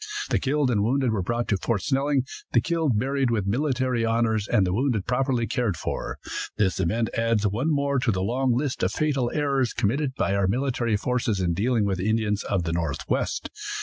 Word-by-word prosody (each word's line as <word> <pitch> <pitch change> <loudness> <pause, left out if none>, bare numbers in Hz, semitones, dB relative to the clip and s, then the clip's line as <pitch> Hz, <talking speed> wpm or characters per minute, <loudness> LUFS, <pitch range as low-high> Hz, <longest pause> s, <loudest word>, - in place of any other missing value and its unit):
The - - +3
killed 140 -1 +1
and 105 -4 +2
wounded 130 +2 +1
were 105 -3 0
brought 115 +5 -1
to 100 - +2
Fort 105 +1 -1
Snelling, 140 -1 +1 0.3
the 120 - +6
killed 155 -2 0
buried 135 +2 +1
with 110 -4 0
military 130 +1 0
honors, 115 -2 +1
and 105 -5 +3
the 90 - -1
wounded 115 -3 0
properly 125 -1 +1
cared 115 -7 -1
for. - - -4 0.4
This 100 -4 +1
event 110 +6 0
adds 115 -2 +1
one 115 +10 0
more 140 -2 +1
to 125 - +1
the 95 -2 -1
long 125 +5 +1
list 135 -1 -2
of 90 - +1
fatal 140 -3 0
errors 140 -4 0
committed 130 +5 0
by 100 - 0
our 100 -1 +2
military 120 -1 0
forces 115 -2 -1
in 90 -2 +1
dealing 110 +3 +1
with 95 -2 -1
the 100 +4 0
Indians 110 -2 +1
of 95 -4 -1
the 80 -1 -2
Northwest. 80 -5 -2
115 Hz, 200 wpm, -25 LUFS, 105-135 Hz, 0.4 s, the